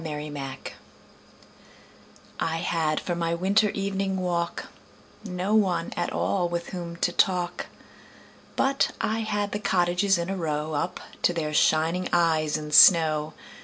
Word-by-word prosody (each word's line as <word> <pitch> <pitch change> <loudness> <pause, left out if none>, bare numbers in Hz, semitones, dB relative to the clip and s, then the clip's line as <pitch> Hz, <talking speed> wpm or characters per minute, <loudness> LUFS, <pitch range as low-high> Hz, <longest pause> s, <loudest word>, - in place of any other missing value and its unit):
Good 150 -1 -5
Hours 135 -2 -6 1.8
I 165 - -1
HAD 160 -2 -1
for 175 - -3
my 170 -1 -1
winter 200 +5 +2
evening 195 -1 -2
walk 175 -2 -2 0.6
No 185 0 -3
one 185 -6 +1
at 175 - -2
all 180 -3 0
with 170 0 -4
whom 170 -2 -6
to 175 +1 0
talk, 180 -1 0 0.9
But 270 0 +1
I 220 +1 -1
had 205 -2 -2
the 210 - -3
cottages 180 0 +1
in 170 +2 -3
a - - -2
row 155 -3 -3
Up 150 +4 -2 0.2
to 175 - +2
their 155 -3 -3
shining 160 +4 +2
eyes 160 -3 +2
in 150 -1 -7
snow. 155 -2 +6
175 Hz, 140 wpm, -25 LUFS, 160-190 Hz, 1.8 s, snow